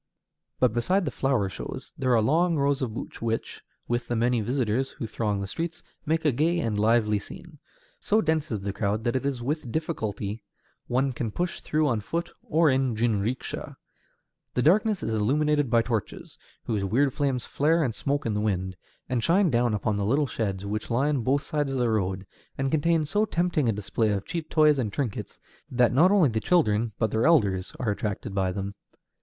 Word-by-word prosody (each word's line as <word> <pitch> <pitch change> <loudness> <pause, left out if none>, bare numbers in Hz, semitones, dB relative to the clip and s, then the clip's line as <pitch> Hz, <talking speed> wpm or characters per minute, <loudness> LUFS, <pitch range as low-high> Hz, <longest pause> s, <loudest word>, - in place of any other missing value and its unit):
But 125 -4 +3
beside 180 +11 +1
the 140 - -2
flower 130 -8 +1
shows, 115 +7 -7
there 130 -4 +2
are 110 - +3
long 165 +7 +3
rows 140 0 +1
of 115 -4 -3
booths, - - -7
which, 115 0 -3 0.3
with 120 +1 -1
the 120 - -1
many 120 +1 +2
visitors 125 +2 0
who - - -6
throng 105 -2 -2
the - - -2
streets, 165 - -5 0.2
make 160 +1 0
a 150 - +5
gay 160 +7 +1
and 115 -9 -1
lively 105 -1 +3
scene. - - -12 0.4
So 215 - +2
dense 160 -5 0
is 105 -3 -2
the 100 0 -3
crowd 105 +2 -1
that 120 +1 0
it 130 +2 0
is 130 -4 -3
with 140 -2 -2
difficulty 110 - -3 0.5
one 130 +2 +1
can 120 -1 -3
push 175 +11 -3
through 155 0 +1
on 120 -5 +1
foot 170 +10 -3
or 160 +1 +2
in 130 -3 +2
jinrikisha. 115 +2 -2 0.8
The 125 - +2
darkness 205 +5 +3
is 115 - -1
illuminated 145 +6 +2
by 115 0 +4
torches, 115 -4 -4 0.2
whose 105 -3 -1
weird 125 +8 +2
flames 135 -4 -1
flare 160 +3 +2
and 120 -5 -1
smoke 140 +6 -2
in 115 - 0
the 105 - -1
wind, 95 -3 -1 0.3
and 125 -3 -1
shine 180 - +3
down 120 -2 +2
upon 105 0 -1
the 100 - -1
little 135 +9 +2
sheds 100 -6 -3
which 105 +2 -3
line 135 +3 +1
both 140 +5 +1
sides 145 -2 -1
of 135 - -2
the 120 -2 +1
road, 95 -2 -1 0.3
and 135 0 -1
contain 160 +1 +2
so 205 +8 +1
tempting 175 - +1
a - - +4
display 105 +2 -1
of 100 -1 -3
cheap 165 -2 -4
toys 150 -3 +4
and 110 -5 -1
trinkets 120 -1 -4 0.3
that 120 -2 +3
not 160 +8 +6
only 190 -8 +4
the 110 -1 -1
children, 115 -8 +2
but 110 -3 0
their 110 +6 +2
elders, 100 - +3
are 115 -5 0
attracted 105 +1 -3
by 95 -2 0
them. 100 +1 -4
125 Hz, 200 wpm, -26 LUFS, 110-150 Hz, 0.8 s, not